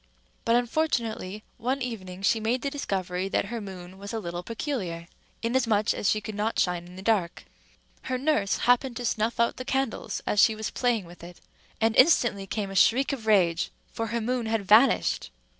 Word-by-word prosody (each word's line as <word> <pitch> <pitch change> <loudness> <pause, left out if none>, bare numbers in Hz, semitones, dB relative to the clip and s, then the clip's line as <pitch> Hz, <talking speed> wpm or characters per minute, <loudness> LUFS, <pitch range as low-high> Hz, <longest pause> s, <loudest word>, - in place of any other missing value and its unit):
But, 230 - +3
unfortunately, 235 -6 -1 0.2
one 255 +4 -1
evening 195 -7 -6
she 225 - +3
made 230 +3 -1
the 280 - -1
discovery 190 -8 -2
that - - 0
her 230 - -3
moon 190 -1 -9
was 200 0 -7
a 225 - -1
little 175 -3 -5
peculiar, 190 - -4 0.4
inasmuch 230 -3 +2
as 200 - 0
she 215 - +2
could 215 - -6
not 210 +2 -1
shine 175 -1 0
in 180 - -13
the 190 - -9
dark. 195 -6 0 0.6
Her 255 - -1
nurse 250 -8 +1
happened 245 0 +3
to 245 - -4
snuff 225 +1 -1
out 235 - +2
the 255 - -5
candles 265 -2 -2
as 210 - +1
she 220 0 +6
was 220 0 -4
playing 240 -6 0
with 170 0 -14
it; 175 0 -11 0.4
and 225 0 +2
instantly 240 -9 +4
came 200 -1 -3
a - - -7
shriek 265 - +4
of 230 -5 -6
rage, 175 -5 +3 0.2
for 225 - -2
her 230 +1 -2
moon 240 0 -1
had 220 -2 -1
vanished. 225 +6 +4
220 Hz, 190 wpm, -27 LUFS, 190-245 Hz, 0.6 s, she